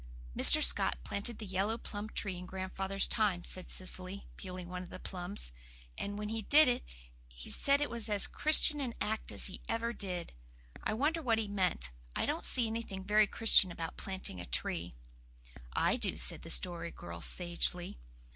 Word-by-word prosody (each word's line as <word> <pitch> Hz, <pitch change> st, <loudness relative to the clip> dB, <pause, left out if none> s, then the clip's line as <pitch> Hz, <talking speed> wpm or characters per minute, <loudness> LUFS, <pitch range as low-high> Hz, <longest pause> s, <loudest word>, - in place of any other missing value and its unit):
"Mr. -, -, +7 dB
Scott -, -, +1 dB
planted 205 Hz, -, -2 dB
the 220 Hz, -, -8 dB
yellow 195 Hz, +4 st, -1 dB
plum 210 Hz, -1 st, -7 dB
tree 195 Hz, -3 st, -1 dB
in 180 Hz, 0 st, -8 dB
Grandfather's 190 Hz, +1 st, +1 dB
time," 200 Hz, -6 st, 0 dB
said 185 Hz, 0 st, -2 dB
Cecily, 185 Hz, +1 st, 0 dB
peeling 185 Hz, -2 st, -8 dB
one 180 Hz, 0 st, -6 dB
of 180 Hz, -, -10 dB
the -, -, -9 dB
plums, 180 Hz, -, -6 dB, 0.4 s
"and 205 Hz, 0 st, -5 dB
when 210 Hz, 0 st, -5 dB
he 225 Hz, 0 st, -3 dB
did 295 Hz, +7 st, +5 dB
it 245 Hz, 0 st, 0 dB, 0.4 s
he -, -, -10 dB
said 280 Hz, 0 st, +2 dB
it 290 Hz, -, -1 dB
was 235 Hz, -1 st, -1 dB
as 205 Hz, -1 st, 0 dB
Christian 300 Hz, -1 st, +6 dB
an 245 Hz, -4 st, -4 dB
act 220 Hz, +1 st, -3 dB
as -, -, 0 dB
he 190 Hz, -, -5 dB
ever 230 Hz, +1 st, -2 dB
did. 180 Hz, -6 st, -5 dB, 0.5 s
I 215 Hz, -, -1 dB
wonder 305 Hz, +7 st, 0 dB
what 235 Hz, -6 st, +1 dB
he 220 Hz, -1 st, -2 dB
meant. 185 Hz, -, -1 dB, 0.2 s
I -, -, 0 dB
don't -, -, -2 dB
see 245 Hz, -, +4 dB
anything 220 Hz, -4 st, -5 dB
very 210 Hz, +2 st, +3 dB
Christian 200 Hz, -4 st, +4 dB
about 165 Hz, -1 st, -6 dB
planting 190 Hz, -, -4 dB
a -, -, -9 dB
tree." 85 Hz, +6 st, -1 dB, 0.8 s
"I -, -, +1 dB
do," -, -, +1 dB
said -, -, +2 dB
the -, -, -10 dB
Story -, -, +2 dB
Girl 85 Hz, 0 st, -10 dB
sagely. 175 Hz, -, +1 dB
200 Hz, 185 wpm, -32 LUFS, 180-225 Hz, 0.8 s, Mr